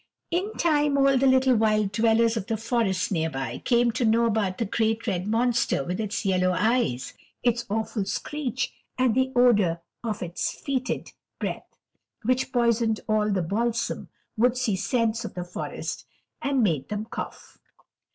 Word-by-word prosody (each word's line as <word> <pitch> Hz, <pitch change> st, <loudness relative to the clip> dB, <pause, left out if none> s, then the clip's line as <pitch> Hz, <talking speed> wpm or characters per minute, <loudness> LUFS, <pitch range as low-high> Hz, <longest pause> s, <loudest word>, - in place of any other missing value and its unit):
In 380 Hz, +5 st, -1 dB
time, 295 Hz, -4 st, +2 dB
all 275 Hz, 0 st, +4 dB
the 265 Hz, +1 st, +3 dB
little 260 Hz, -1 st, +4 dB
wild 215 Hz, -2 st, +2 dB
dwellers 225 Hz, +2 st, +3 dB
of 210 Hz, -4 st, -3 dB
the 225 Hz, -, -1 dB
forest 220 Hz, -5 st, 0 dB
near 160 Hz, -3 st, 0 dB
by 135 Hz, -5 st, -4 dB
came 240 Hz, -1 st, +2 dB
to 230 Hz, +2 st, -1 dB
know 230 Hz, +1 st, +4 dB
about 205 Hz, -5 st, 0 dB
the 230 Hz, -, -1 dB
great 220 Hz, +2 st, 0 dB
red 190 Hz, -4 st, -1 dB
monster 235 Hz, -, +1 dB
with 180 Hz, +6 st, -3 dB
its 210 Hz, -1 st, -3 dB
yellow 185 Hz, -1 st, +2 dB
eyes, 210 Hz, -, +1 dB, 0.3 s
its 240 Hz, -1 st, +1 dB
awful 220 Hz, -1 st, -1 dB
screech, 260 Hz, 0 st, -3 dB, 0.2 s
and 255 Hz, -3 st, +3 dB
the 260 Hz, +2 st, +1 dB
odor 210 Hz, -9 st, +4 dB, 0.2 s
of 215 Hz, -5 st, -3 dB
its 175 Hz, 0 st, -2 dB
fetid 260 Hz, -3 st, -2 dB, 0.3 s
breath, -, -, -4 dB, 0.5 s
which 255 Hz, +3 st, +1 dB
poisoned 235 Hz, -3 st, +2 dB
all 215 Hz, -1 st, +2 dB
the 190 Hz, -3 st, +1 dB
balsam, 230 Hz, +7 st, -1 dB, 0.3 s
woodsy 245 Hz, -2 st, +2 dB
scents 230 Hz, +3 st, 0 dB
of 225 Hz, -, -7 dB
the 180 Hz, -, -3 dB
forest, 175 Hz, 0 st, -5 dB, 0.3 s
and 275 Hz, -3 st, +1 dB
made 155 Hz, -9 st, 0 dB
them 210 Hz, +1 st, -3 dB
cough. -, -, -8 dB
225 Hz, 160 wpm, -26 LUFS, 200-245 Hz, 0.5 s, all